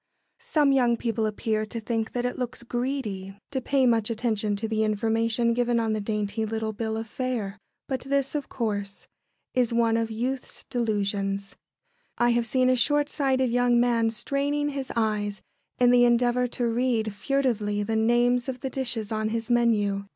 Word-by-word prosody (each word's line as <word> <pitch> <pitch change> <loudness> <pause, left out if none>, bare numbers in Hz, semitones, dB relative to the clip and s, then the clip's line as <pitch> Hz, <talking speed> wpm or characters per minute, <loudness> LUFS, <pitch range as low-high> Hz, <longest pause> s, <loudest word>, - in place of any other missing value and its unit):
Some 310 -12 +2
young 245 -3 +3
people 225 -2 -1
appear 215 0 -1
to 230 +2 -5
think 225 0 -2
that 245 0 -1
it 250 - -1
looks 250 -1 -4
"greedy" 235 -6 -3
to 265 -2 -2
pay 270 +1 +2
much 230 -3 +2
attention 220 -2 0
to 215 +2 -3
the 220 0 0
information 225 +2 +1
given 240 0 +1
on 225 -1 0
the 215 - -1
dainty 210 +1 -2
little 220 0 -2
bill 220 +1 -3
of 225 - -3
fare; 220 -5 -3 0.3
but 265 -1 -1
this, 275 +1 -1
of 295 -2 -3
course, 205 -4 -3 0.5
is 245 -2 +2
one 230 -1 +3
of 225 -1 -1
youth's 250 +4 -4
delusions. 200 -4 -1 0.6
I 240 - +3
have 235 -1 +1
seen 255 0 +2
a 255 - +4
short 290 +3 +2
sighted 265 -4 +1
young 245 0 +3
man 235 -2 +3
straining 285 +5 -1
his 275 -2 -4
eyes 210 -3 0 0.4
in 245 -1 +5
the 245 0 +6
endeavour 245 +1 +3
to 245 0 -2
read 230 -2 0
furtively 215 -4 0
the 220 +2 -1
names 240 +3 +2
of 255 -1 -5
the 265 - -3
dishes 240 -5 -2
on 215 0 0
his 230 +2 -3
menu. 210 -4 +2
235 Hz, 175 wpm, -26 LUFS, 220-250 Hz, 0.6 s, the